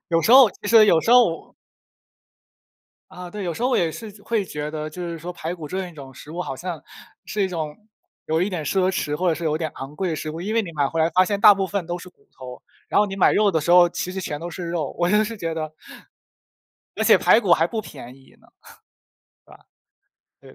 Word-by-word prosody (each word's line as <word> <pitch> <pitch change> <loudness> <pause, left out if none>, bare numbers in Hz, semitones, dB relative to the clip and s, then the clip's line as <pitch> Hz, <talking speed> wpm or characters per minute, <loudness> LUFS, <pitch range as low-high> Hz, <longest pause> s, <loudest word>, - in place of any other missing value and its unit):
有 165 -1 +2
时 220 - +2
候 260 -4 +8
其 205 - -11
实 225 -2 +7
有 165 -5 +4
时 225 - -1
候 240 -10 +3 1.6
啊， 180 -1 -9
对， 205 0 -6
有 170 -2 -3
时 235 - -6
候 250 - +2
我 - - +2
也 165 -2 +1
是 215 +7 -9
会 220 -2 -1
觉 150 -3 -5
得， 155 0 -5
就 180 +3 -8
是 170 -1 -5
说 175 +3 -7
排 170 0 -5
骨 155 -4 -9
这 190 +2 -4
一 - - -14
种 135 -3 -11
食 145 +3 -13
物， 180 +2 -4
好 135 - -6
像 175 -2 -6 0.4
是 210 - -4
一 190 - 0
种， 155 -4 -5 0.5
有 160 +2 0
一 200 - -1
点 165 -5 -4
奢 185 +2 +1
侈， 150 -6 -2
或 180 +3 0
者 165 - +2
是 170 - -7
有 155 -1 0
点 160 -1 -3
昂 135 +2 -8
贵 185 +4 -2
的 160 - -2
食 155 - -5
物， 165 +2 -7
因 210 +5 -3
为 230 - +2
你 170 - -8
买 145 -3 0
回 165 - -4
来 160 - +3
发 185 +3 +4
现 200 +1 -2
大 205 - +8
部 195 -1 -2
分 190 -1 -3
都 175 +1 -3
是 180 - -11
骨 - - -27
头。 125 -1 -11 0.3
然 - - +1
后 210 - +2
你 195 0 -6
买 190 - +4
肉 210 -1 +3
的 160 - 0
时 160 - -2
候 175 -1 +7
其 180 +1 -5
实 190 - -4
全 150 -4 -5
都 175 +1 -6
是 175 0 -6
肉， 170 -4 -3
我 175 0 +1
就 210 +1 +4
是 230 +1 -6
觉 165 -4 -4
得 155 -1 -5 1.2
而 - - -1
且 - - +6
排 225 - +4
骨 190 -6 +1
还 165 0 +4
不 220 +3 -4
便 125 - -11
宜 135 -1 -21
呢， - - -24 1.9
是 - - -16
吧？ - - -19
175 Hz, 275 characters per minute, -22 LUFS, 155-195 Hz, 1.9 s, 候